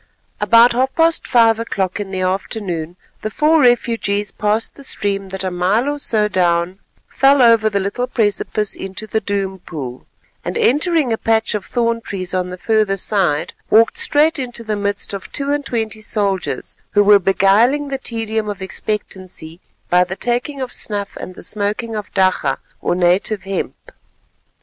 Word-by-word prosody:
About 230 +1 +6
half 260 +2 0
past 330 0 +2
five 230 -3 +4
o'clock 195 -5 -2
in 205 -2 -4
the 190 -1 -3
afternoon 185 -3 -3 0.3
the 215 - -3
four 310 +7 +3
refugees 230 -5 +2
passed 210 +2 -1
the 280 - -12
stream 195 -6 -1
that 190 0 -5
a 185 - -2
mile 190 +8 +1
or 290 0 -2
so 215 -6 +1
down 180 -1 +1 0.3
fell 275 +1 +4
over 230 -3 +5
the 200 -1 0
little 200 +6 -2
precipice 210 -3 -1
into 195 +3 -6
the 220 0 -1
Doom 195 -2 -2
Pool; 135 -8 -7 0.4
and, - - -3
entering 310 - +2
a 225 - -2
patch 225 0 +1
of 210 -2 -3
thorn 230 -1 0
trees 185 -4 -4
on 180 -1 -1
the 180 - -6
further 215 -1 +1
side, 185 -7 0 0.2
walked 225 +1 +4
straight 300 +1 +3
into 245 -3 -4
the 215 -1 -2
midst 205 0 -2
of 195 - -7
two 280 0 -1
and 290 -1 -1
twenty 220 -2 -2
soldiers, 195 - -1 0.2
who 205 - +5
were 205 0 +7
beguiling 210 +10 +3
the 270 -1 -3
tedium 220 -3 -2
of 205 -2 -5
expectancy 185 -4 -5 0.3
by 180 0 +5
the 180 +1 -5
taking 245 +7 -2
of 255 -1 -4
snuff 205 -1 -2
and 185 - -8
the - - -10
smoking 215 +2 -2
of 210 -1 -5
dakka 185 -8 +2 0.2
or - - 0
native 185 +4 +1
hemp. 195 0 -5
210 Hz, 170 wpm, -18 LUFS, 190-235 Hz, 0.4 s, were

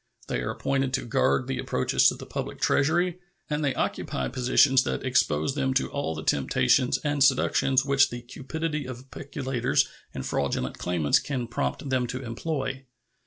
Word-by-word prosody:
They - - -1
are - - -3
appointed 135 -1 0
to - - -3
guard 120 +2 +2
the 135 0 -3
approaches 65 - +2
to - - +2
the - - -9
public - - -5
Treasury, 175 +5 +2 0.3
and 150 +1 0
they 140 -2 0
occupy 65 -1 -2
positions 130 +1 +4
that - - -3
expose 80 - +1
them 135 -2 -1
to 135 - +1
all 140 - -2
the 80 - -6
temptations 70 - +2
and 145 -2 +2
seductions 135 0 +3
which 140 -1 +4
the 120 0 -7
cupidity 150 +3 -4
of 130 +1 -9
peculators 135 -3 -1 0.2
and 65 - -6
fraudulent 65 +1 -2
claimants 85 -5 +2
can 130 -4 -3
prompt 120 +4 -3
them 130 -2 0
to 130 +2 -5
employ. 135 +2 -3
130 Hz, 165 wpm, -26 LUFS, 120-140 Hz, 0.3 s, positions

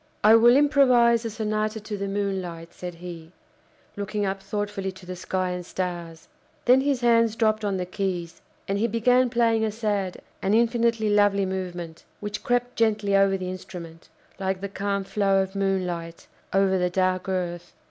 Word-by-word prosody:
"I 215 +1 +7
will 235 +2 +7
improvise 250 -5 +4
a - - -1
Sonata 215 0 -2
to 210 0 -6
the 200 0 -3
Moonlight!" 190 -4 -3
said 180 -1 -7
he, 170 -1 -9 0.6
looking 205 0 -2
up 195 0 -2
thoughtfully 200 -1 -3
to 190 -1 -14
the 185 0 -6
sky 185 0 -2
and 180 0 -4
stars. 170 -3 -5 0.4
Then 255 +2 +6
his 275 -2 0
hands 230 -2 +3
dropped 215 -1 +1
on 200 -2 0
the 180 - -2
keys, 180 -3 -4 0.3
and 195 +1 -1
he 230 - +2
began 245 +3 +3
playing 230 -2 +2
a 220 - 0
sad 205 -4 -2 0.2
and 195 +3 +2
infinitely 230 -2 +2
lovely 205 -1 +3
movement, 175 -3 -5 0.2
which 210 0 -5
crept 245 0 0
gently 215 -3 +2
over 195 0 +4
the 185 -1 -4
instrument, 175 -3 -9 0.3
like 190 -1 -1
the 200 +1 -5
calm 200 0 -2
flow 195 0 +1
of 190 0 -8
moonlight 180 -4 -2 0.3
over 190 -1 +2
the 180 0 +1
dark 185 +1 0
earth. 175 -2 -3
195 Hz, 170 wpm, -25 LUFS, 185-220 Hz, 0.6 s, I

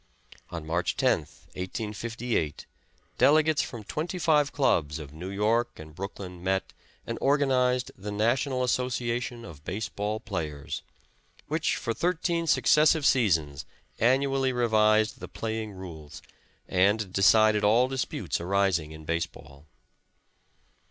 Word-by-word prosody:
On 85 -3 -6
March 85 +2 -1
10th, - - 0
1858, 105 - -3 0.5
delegates 155 +1 +4
from 115 -3 -6
twenty 165 - -4
five 150 -5 +3
clubs 80 - +1
of 75 -2 -9
New 90 +4 -7
York 110 +4 0
and 80 0 -11
Brooklyn 90 0 -7
met 95 +1 -1 0.3
and - - -4
organized 130 -3 +2
the 105 +2 -6
National 125 +5 +1
Association 125 -1 -1
of 75 -6 -12
Base 100 +5 -4
ball 105 +1 -3
Players, 75 -8 -5 0.7
which - - 0
for 115 - -2
thirteen 170 +2 0
successive 155 0 +4
seasons 80 - +2 0.4
annually 135 +2 +2
revised 110 -3 +3
the - - -7
playing 110 -1 -4
rules, 80 -6 -10 0.4
and 100 +1 +2
decided 105 +2 +5
all 115 +5 +4
disputes 130 -8 -3
arising 90 -4 +1
in 80 0 -11
base 85 +1 0
ball. 70 +3 -16
110 Hz, 120 wpm, -27 LUFS, 90-125 Hz, 0.7 s, decided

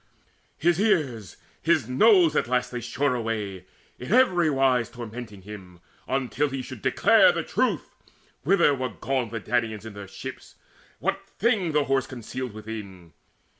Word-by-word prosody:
His 170 +2 +2
ears, 145 - 0 0.2
his 160 -7 +2
nose, 175 - +5
at - - +1
last 125 0 0
they 125 - -3
shore 130 +4 0
away 105 -6 -3 0.3
In 125 - -7
every 185 -10 +4
wise 135 -4 +2
tormenting 115 -4 -8
him, 95 -4 -11 0.3
until 135 +2 0
He 135 -1 -4
should 130 -4 -9
declare - - +5
the - - -2
truth, - - -1 0.5
whither 170 -2 +4
were 130 -2 -2
gone 130 -3 -2
The 115 +1 -4
Danaans 110 -1 -1
in 110 - -8
their 100 -1 -9
ships, - - -9 0.4
what - - -2
thing 200 -7 +1
the 150 -1 +3
Horse 135 -1 0
Concealed 125 0 -6
within 105 -5 -8
it. - - -29
125 Hz, 155 wpm, -25 LUFS, 110-150 Hz, 0.5 s, nose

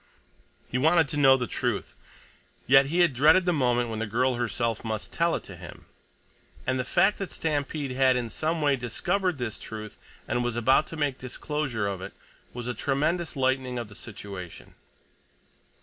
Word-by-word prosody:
He 125 - -2
wanted 160 +3 +4
to 150 - -3
know 135 -2 +6
the 125 - -2
truth, - - -2 0.7
yet 135 +1 +6
he 170 +5 +2
had 170 -5 +4
dreaded 155 +8 +5
the 180 - +2
moment 120 -5 +1
when 110 - -3
the 115 - -2
girl 125 +5 +1
herself 115 -1 -1
must 110 -2 -4
tell 170 +1 +2
it - - -4
to 95 - -10
him, 85 -1 -11 0.8
and 130 0 0
the - - 0
fact 195 +10 +2
that 195 - -4
Stampede 145 -2 -2
had 130 0 +3
in 120 -2 -3
some 160 0 -1
way 145 -1 +4
discovered 175 - -1
this 120 -4 -4
truth, 110 -1 -8 0.3
and 120 0 0
was 120 -1 -2
about 130 +6 +3
to 165 - -8
make 145 -3 -1
disclosure 130 -3 -3
of 100 -2 -3
it, - - -7 0.4
was 120 0 -6
a 125 - -1
tremendous 150 +8 -1
lightening 130 -1 0
of 120 -3 -5
the 105 - -13
situation. 100 -5 -9
130 Hz, 180 wpm, -27 LUFS, 115-150 Hz, 0.8 s, know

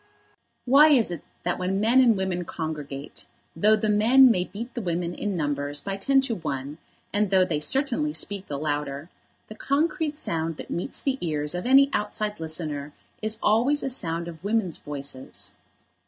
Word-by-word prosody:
Why 280 +5 +7
is 255 -11 +4
it 170 -4 -5 0.2
that 180 0 -1
when 185 +2 -1
men 235 +5 +4
and 230 -5 +4
women 185 -2 -2
congregate, 150 -4 -6 0.3
though 210 +6 +4
the 215 0 -1
men 235 +5 +6
may 180 -4 0
beat 230 +6 -8
the 240 - -4
women 175 -2 -2
in 205 -1 -3
numbers 145 -1 -1
by 195 +4 -4
ten 270 +8 +3
to 265 -3 -2
one, 145 -5 -5 0.3
and 205 0 +1
though 190 -1 +4
they 160 -5 -1
certainly 275 - +1
speak 200 -9 0
the 145 - -4
louder, 145 +1 -3 0.4
the - - -9
concrete 300 +4 -1
sound 165 - -1
that - - -9
meets 175 - -4
the 270 -1 -1
ears 150 -2 -1
of 180 +5 -3
any 275 +2 +6
outside 210 0 -2
listener 155 -3 -5 0.3
is 215 0 -1
always 245 +7 +3
a 270 - -2
sound 170 -7 0
of 165 0 -10
women's 205 -5 0
voices? 140 -2 -5
190 Hz, 175 wpm, -25 LUFS, 155-235 Hz, 0.4 s, Why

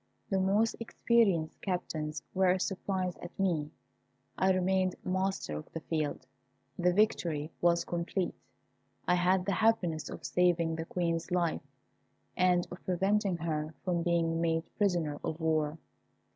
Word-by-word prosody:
The 195 - +2
most 205 +4 +2
experienced 220 -8 +1
captains 160 -5 -3
were 185 -1 +3
surprised 185 -1 -2
at 175 - -10
me. 165 -6 +1 0.7
I 190 0 +3
remained 185 0 +2
master 185 - -1
of 75 - -7
the 165 - -3
field. 155 -4 -2 0.5
The 180 0 +4
victory 170 -6 +1
was 170 0 +3
complete. 175 +1 -2 0.7
I 180 - +4
had 180 +1 +3
the 200 - 0
happiness 180 -8 +1
of - - -8
saving 170 -2 +2
the 165 0 -4
Queen's 170 -1 -1
life, 175 -2 +1 0.7
and 180 -1 +3
of 180 - -9
preventing 195 +1 +1
her 155 -1 -3
from 175 -2 +1
being 165 -1 +1
made 165 -1 +1
prisoner 175 -8 +1
of 160 - -3
war. 155 -1 +1
175 Hz, 135 wpm, -31 LUFS, 165-190 Hz, 0.7 s, The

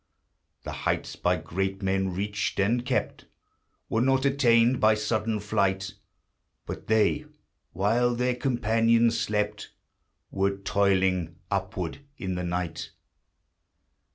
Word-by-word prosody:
The - - -5
heights - - -2
by 90 +1 +1
great 95 +4 -3
men 95 0 0
reached 100 +3 -2
and 115 +5 +2
kept 125 +1 -2 0.6
Were 110 - 0
not 135 +1 +2
attained 125 -3 +4
by 110 0 +5
sudden 110 0 -1
flight, 95 -1 0 0.7
But - - -7
they, 110 +7 +2 0.5
while 115 +6 +2
their 125 +1 +1
companions 115 -2 +2
slept, 105 -1 -2 0.6
Were 100 0 0
toiling 95 -4 +1 0.2
upward - - -3 0.2
in 95 -1 -3
the 90 0 -3
night. 85 -2 -3
105 Hz, 110 wpm, -27 LUFS, 95-115 Hz, 0.7 s, by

